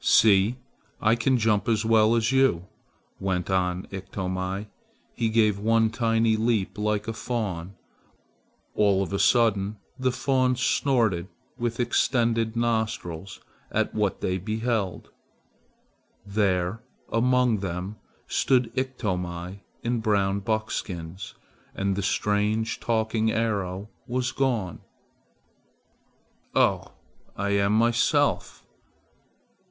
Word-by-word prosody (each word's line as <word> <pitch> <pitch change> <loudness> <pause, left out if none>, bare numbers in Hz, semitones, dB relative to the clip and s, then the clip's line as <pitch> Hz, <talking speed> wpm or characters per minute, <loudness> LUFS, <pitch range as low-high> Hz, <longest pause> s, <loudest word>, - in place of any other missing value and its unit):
"See! 105 +2 +5 0.4
I 110 +1 +3
can 130 +2 +2
jump 110 -3 +1
as 110 -1 +1
well 110 0 +4
as 115 +1 +1
you!" 130 -11 +3 0.5
went 95 -1 -1
on 90 -1 0
Iktomi. 95 0 -4 0.5
He 115 -2 0
gave 110 -3 +3
one 110 +1 +2
tiny 115 -1 +2
leap 110 -2 0
like 105 0 -1
a 115 - -2
fawn. 100 -6 -4 1.0
All 100 -2 +3
of 95 - -6
a 100 - 0
sudden 105 -2 +3 0.2
the 130 0 +1
fawns 130 0 +1
snorted 115 -10 +1 0.3
with 120 0 -3
extended 115 -1 +1
nostrils 110 -7 -2 0.3
at - - 0
what - - -1
they 95 0 -1
beheld. 110 -1 -2 1.1
There 100 0 0 0.3
among 125 -1 +3
them 95 +2 -4 0.3
stood 125 -3 +1
Iktomi 95 -8 -3 0.2
in 120 0 0
brown 100 -3 +1
buckskins, 100 -4 -4 0.4
and 100 0 0
the 100 - -2
strange 105 +3 0
talking 110 -1 0
arrow 100 -4 -1 0.2
was 125 +1 -1
gone. 120 -11 -1 1.8
"Oh! - - +2 0.4
I 100 0 -1
am 100 0 +2
myself. 115 +1 +1
110 Hz, 105 wpm, -26 LUFS, 95-115 Hz, 1.8 s, See